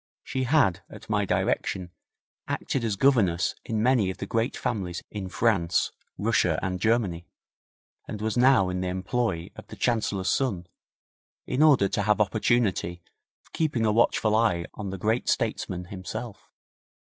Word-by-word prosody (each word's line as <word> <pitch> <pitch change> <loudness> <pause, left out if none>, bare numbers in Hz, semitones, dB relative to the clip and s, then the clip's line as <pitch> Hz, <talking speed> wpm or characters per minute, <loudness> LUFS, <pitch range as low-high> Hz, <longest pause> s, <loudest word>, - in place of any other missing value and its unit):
She 130 -1 -2
had, 125 - +3
at - - -10
my - - +2
direction, 90 -2 -1 0.6
acted 130 - -2
as 110 -3 0
governess 100 -8 +3
in 110 -1 -1
many 120 -6 +3
of 95 - -5
the - - -5
great 115 +4 -1
families 95 -8 -3
in 100 -3 -5
France, 95 -5 +1 0.3
Russia 100 -6 +2
and 90 -1 -2
Germany, 100 -6 0 0.8
and 105 - -6
was 110 0 -2
now 125 -6 +4
in 90 0 -2
the 95 - -2
employ 95 -1 -2
of - - -11
the - - -10
Chancellor's 105 -5 0
son, 100 -10 0 0.8
in 130 - -1
order 140 -10 +6
to - - -1
have 105 +1 +2
opportunity 100 -4 +1 0.4
of - - -28
keeping 145 -8 0
a 105 - +3
watchful 110 -1 +2
eye 105 -7 +2
on 105 -3 -6
the 95 - -5
great 110 +6 0
statesman 95 -5 -1
himself. 95 +3 -7
105 Hz, 155 wpm, -26 LUFS, 95-120 Hz, 0.8 s, order